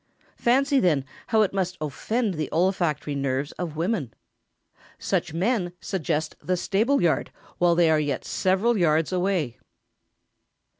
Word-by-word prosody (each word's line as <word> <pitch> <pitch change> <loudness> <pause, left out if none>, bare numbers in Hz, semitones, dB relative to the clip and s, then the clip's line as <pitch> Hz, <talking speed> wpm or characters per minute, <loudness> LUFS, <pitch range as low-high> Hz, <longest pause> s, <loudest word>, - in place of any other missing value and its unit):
Fancy, 275 +3 +3
then, 155 - +2 0.2
how 220 -1 +4
it 195 - -1
must 185 -2 -1
offend 200 - -1
the 155 -2 -3
olfactory 170 -4 0
nerves 140 0 -1
of 170 -4 -4
women. 165 - -1 0.9
Such - - -1
men 180 +1 0
suggest 160 -5 -2
the 180 +4 -1
stableyard 205 - +1 0.3
while 175 -1 +4
they 170 -1 +4
are 155 - +4
yet 145 -2 -2
several 195 +4 +1
yards 160 -1 +2
away! 180 -9 0
175 Hz, 130 wpm, -25 LUFS, 155-195 Hz, 0.9 s, how